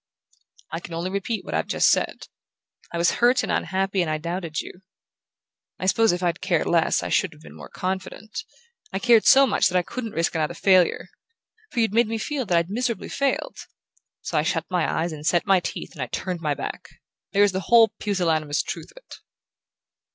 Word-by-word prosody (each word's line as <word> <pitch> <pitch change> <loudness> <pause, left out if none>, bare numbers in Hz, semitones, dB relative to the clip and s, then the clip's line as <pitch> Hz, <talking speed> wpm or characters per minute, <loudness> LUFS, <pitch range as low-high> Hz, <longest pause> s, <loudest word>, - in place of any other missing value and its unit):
"I 165 - -3
can 170 -1 -8
only 175 +3 -3
repeat 200 +3 -3
what - - -6
I've - - 0
just - - +2
said. - - 0 0.6
I 170 - -4
was 170 0 +3
hurt 245 +2 +4
and - - -2
unhappy 190 0 0
and 170 - -1
I 155 - 0
doubted 170 0 -4
you. 180 - -8 1.0
I - - -4
suppose 225 +4 +4
if 175 +1 -3
I'd 170 -1 0
cared - - +1
less - - +2
I - - -3
should - - +1
have 75 - -18
been 75 -1 -13
more 75 - -11
confident. 190 - -5 0.5
I - - -2
cared 230 +1 +4
so 275 +1 +8
much 200 -5 +2
that 180 -1 +1
I 180 - +2
couldn't 230 +2 -6
risk 165 +1 0
another 155 -2 -1
failure. 185 -3 +3 0.6
For 235 - -1
you'd 225 -3 +1
made 235 0 +4
me 225 +1 -2
feel 265 +1 -3
that 175 - +3
I'd 170 +1 0
miserably 235 +1 -2
failed. 275 -1 -1 0.6
So - - -1
I - - +3
shut 165 0 -1
my 180 -3 +1
eyes 165 +1 -1
and 150 -1 -8
set 170 +2 +2
my 195 -2 +4
teeth 175 - -6
and 130 -5 -5
turned 180 -3 -3
my 150 -3 0
back. - - -6 0.4
There's 205 0 +4
the 190 - -2
whole 230 -2 +7
pusillanimous 165 -7 0
truth - - -6
of - - -22
it!" - - -12
185 Hz, 205 wpm, -24 LUFS, 165-220 Hz, 1.0 s, so